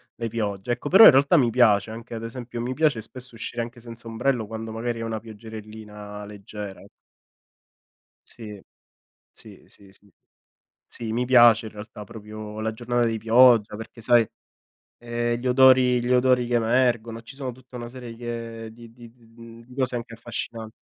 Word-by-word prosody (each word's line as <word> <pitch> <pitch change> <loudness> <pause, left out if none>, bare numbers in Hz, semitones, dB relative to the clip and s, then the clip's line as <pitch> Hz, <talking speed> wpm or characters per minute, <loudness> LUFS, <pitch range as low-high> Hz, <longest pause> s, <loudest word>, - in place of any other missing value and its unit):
le 115 - -4
piogge, 105 0 -2
ecco. 145 - -5
Però 195 +7 +9
in - - +13
realtà 140 +5 +4
mi 125 -5 +3
piace, 110 -4 +3
anche 115 +1 -9
ad 115 0 -5
esempio, 120 0 -6
mi 125 +2 -3
piace 150 -6 +1
spesso 125 +2 -11
uscire 115 +1 -4
anche 120 +1 -10
senza 115 0 -11
ombrello, 115 +1 -1
quando 110 +1 -7
magari 115 +1 -3
è - - -4
una 115 -1 -3
pioggerellina 110 -1 -10
leggera. 100 -1 -9 1.4
Sì, 105 -4 -10 0.7
sì, - - -11
sì, 100 -1 -17
sì. 100 +1 -19 0.7
Sì, 115 -2 -6
mi 125 +2 -1
piace 120 -3 +6
in 110 - -9
realtà 105 0 -10
proprio 105 0 -9
la 110 0 -2
giornata 120 +2 -1
di 115 -1 -1
pioggia, 115 -1 +5
perché 110 +2 -10
sai, 120 0 +4 0.7
ehm, 120 0 -2
gli 130 - -6
odori 125 -1 +5
gli 125 - +1
odori 125 -1 +3
che 120 0 +1
emergono, 115 -1 +1
ci 115 - -13
sono 135 -2 -5
tutta 130 +1 -14
una 120 -1 -6
serie 120 -1 -9
che 115 -1 -6
di 115 0 -14
di 120 -1 -14
d 115 - -30 0.2
mhmm, 115 0 -12
di 125 +2 -16
cose 130 -2 -1
anche 115 0 -7
affascinanti. 115 -1 -6
115 Hz, 175 wpm, -24 LUFS, 110-120 Hz, 1.4 s, in